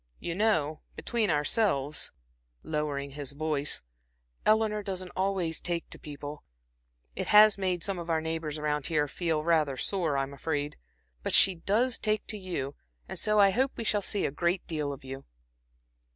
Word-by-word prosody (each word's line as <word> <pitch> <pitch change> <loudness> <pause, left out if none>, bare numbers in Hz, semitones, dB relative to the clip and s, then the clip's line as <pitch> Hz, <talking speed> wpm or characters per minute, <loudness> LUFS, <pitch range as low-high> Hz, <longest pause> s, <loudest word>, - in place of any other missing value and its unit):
You 170 - -3
know, 165 -7 +1 0.2
between 230 -4 0
ourselves" 150 -1 +2 0.5
lowering 145 -2 -2
his 140 -1 -4
voice 145 - -1 0.6
"Eleanor 215 -1 +3
doesn't 185 -2 -4
always 185 -4 0
take 170 -1 -2
to - - -6
people; 145 0 -8 0.7
it - - -3
has 210 0 +8
made 180 -3 0
some 195 -3 -1
of 170 0 -7
our 160 -1 +2
neighbors 160 -1 -3
around 150 -1 -1
here 150 -3 +1
feel 160 0 -1
rather 155 -5 +2
sore 165 -3 0
I'm 135 0 -2
afraid. 145 0 -2 0.5
But - - -2
she 195 - +8
does 220 +8 +1
take 215 -1 0
to 215 - -1
you, 170 -8 -4 0.3
and - - -6
so 215 0 +2
I 200 -1 +7
hope 260 +7 +1
we - - -3
shall 210 -2 +2
see 200 +1 0
a - - -1
great 170 +5 0
deal 150 -3 -2
of 140 - -8
you." 135 0 -7
165 Hz, 165 wpm, -29 LUFS, 145-195 Hz, 0.7 s, has